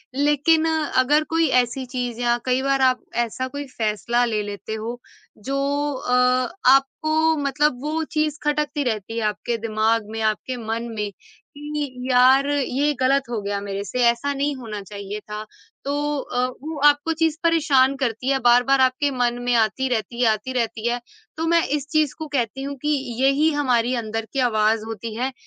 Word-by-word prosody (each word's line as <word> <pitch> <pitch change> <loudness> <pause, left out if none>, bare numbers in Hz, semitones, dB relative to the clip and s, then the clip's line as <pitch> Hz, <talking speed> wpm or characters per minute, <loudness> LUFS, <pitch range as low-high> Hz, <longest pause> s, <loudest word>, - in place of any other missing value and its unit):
लेकिन 295 +3 +3
अगर 300 -1 +2
कोई 330 -1 +3 0.2
ऐसी 255 +2 -6
चीज़ 245 -2 -4
या 240 0 +2
कई 255 +1 +1
बार 275 -1 +1
आप 255 -1 +3 0.3
ऐसा 260 +4 -4
कोई 285 +2 -6
फ़ैसला 230 +2 0
ले 215 -3 -1
लेते 205 +1 -6
हो, 230 +3 -5 0.4
जो 270 +6 -3 0.4
अ, 250 -1 -3 0.6
आपको 310 +4 +3
मतलब 285 -2 0
वो 315 +2 -2
चीज़ 305 -2 0
खटकती 295 0 0
रहती 225 -2 -3
है 225 - -1
आपके 230 +3 -2
दिमाग 220 0 +1
में, 225 0 -5
आपके 220 +4 -1
मन 225 +1 -2
में 210 -1 -3 0.5
कि, 290 -4 -5
यार, 260 +2 +5
ये 285 +1 +1
गलत 270 +1 +3
हो 230 -3 -2
गया 200 0 -2
मेरे 200 0 -4
से। 250 +6 -5
ऐसा 235 +5 +1
नहीं 280 +1 -1
होना 220 -5 -6
चाहिए 200 +1 -7
था। 210 0 -7 0.4
तो 280 - -1 0.3
अ, 250 -1 -1 0.2
वो 315 +1 -5
आपको 290 +3 +3
चीज़ 320 -1 +2
परेशान 285 -5 +3
करती 250 0 -2
है, 270 -1 +2
बार-बार 245 +2 +4
आपके 260 +3 +2
मन 245 -1 0
में 245 0 +1
आती 230 +4 +1
रहती 235 0 -2
है, 235 - +4
आती 215 +5 -3
रहती 230 -2 -1
है। 240 +1 0 0.4
तो 325 - -1
मैं 335 - +4
इस 285 0 -7
चीज़ 310 -3 +2
को 315 - -5
कहती 255 +2 -1
हूँ 280 0 -4
कि 300 - -1 0.3
यही 290 +4 +3
हमारी 250 -4 +1
अंदर 225 +1 -4
की 275 - -1
आवाज़ 215 0 +2
होती 225 0 -6
है, 255 +3 -1
255 Hz, 180 wpm, -22 LUFS, 225-285 Hz, 0.6 s, यार